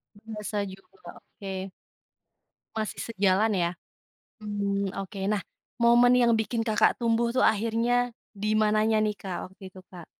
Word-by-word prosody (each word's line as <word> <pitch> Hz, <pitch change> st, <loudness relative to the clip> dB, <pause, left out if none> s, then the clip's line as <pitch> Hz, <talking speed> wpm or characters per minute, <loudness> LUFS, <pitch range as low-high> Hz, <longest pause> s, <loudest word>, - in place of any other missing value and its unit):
Bahasa 210 Hz, -1 st, -6 dB
juga, 195 Hz, -, -15 dB, 0.2 s
oke. 190 Hz, -2 st, -7 dB, 1.1 s
Masih 215 Hz, -1 st, -3 dB
sejalan 200 Hz, +2 st, +2 dB
ya? 170 Hz, -2 st, +1 dB, 0.7 s
Mmm, 200 Hz, -2 st, -2 dB
oke. 195 Hz, +1 st, -9 dB
Nah, 210 Hz, -2 st, 0 dB, 0.4 s
momen 240 Hz, +1 st, +6 dB
yang 240 Hz, -1 st, +4 dB
bikin 225 Hz, +1 st, -1 dB
Kakak 220 Hz, -2 st, +2 dB
tumbuh 235 Hz, 0 st, +2 dB
tuh 255 Hz, -, +3 dB
akhirnya 230 Hz, +3 st, +2 dB, 0.2 s
dimananya 215 Hz, +1 st, +2 dB
nih, 210 Hz, -1 st, 0 dB
Kak, 185 Hz, -1 st, -6 dB
waktu 190 Hz, 0 st, -12 dB
itu, 185 Hz, -, -13 dB
Kak? 175 Hz, -3 st, -10 dB
215 Hz, 130 wpm, -27 LUFS, 195-230 Hz, 1.1 s, momen